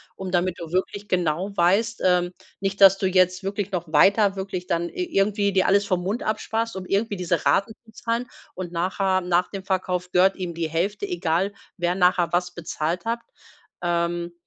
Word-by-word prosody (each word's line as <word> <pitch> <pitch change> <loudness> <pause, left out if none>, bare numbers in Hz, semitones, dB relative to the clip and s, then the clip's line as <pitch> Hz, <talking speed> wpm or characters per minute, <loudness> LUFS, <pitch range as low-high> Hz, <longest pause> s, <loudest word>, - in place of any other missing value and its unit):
um 190 -1 -6
damit 180 -1 0
du 165 -1 -7
wirklich 200 +2 -2
genau 180 +2 0
weißt 205 +6 +2
ähm, 180 -1 +3 0.3
nicht, 195 0 -2
dass 195 0 +8
du 190 - +1
jetzt 185 0 +2
wirklich 200 0 -3
noch 170 -3 -4
weiter 200 +5 +5
wirklich 190 -2 -5
dann 170 0 -1
i 365 - -3
irgendwie 200 0 +2
dir 190 - +3
alles 200 +1 +3
vom 180 -2 0
Mund 205 +6 -2
absparst, 225 0 -2
um 185 - -6
irgendwie 205 +1 0
diese 170 -3 -1
Raten 220 +3 +2
zu 220 - -18
zahlen. 235 +2 -2 0.3
Und 180 -2 -5
nachher, 185 +2 0
nach 180 0 +1
dem 195 -2 -6
Verkauf, 180 -1 -2
gehört 190 +2 +4
ihm 180 -2 -4
die 165 -1 -2
Hälfte, 200 +6 -1
egal, 175 +3 0 0.2
wer 175 +1 0
nachher 180 -2 +2
was 180 0 +1
bezahlt 170 +3 -3
hat. 230 +1 -1 0.6
Ähm 170 0 -1
185 Hz, 185 wpm, -24 LUFS, 175-200 Hz, 0.6 s, dass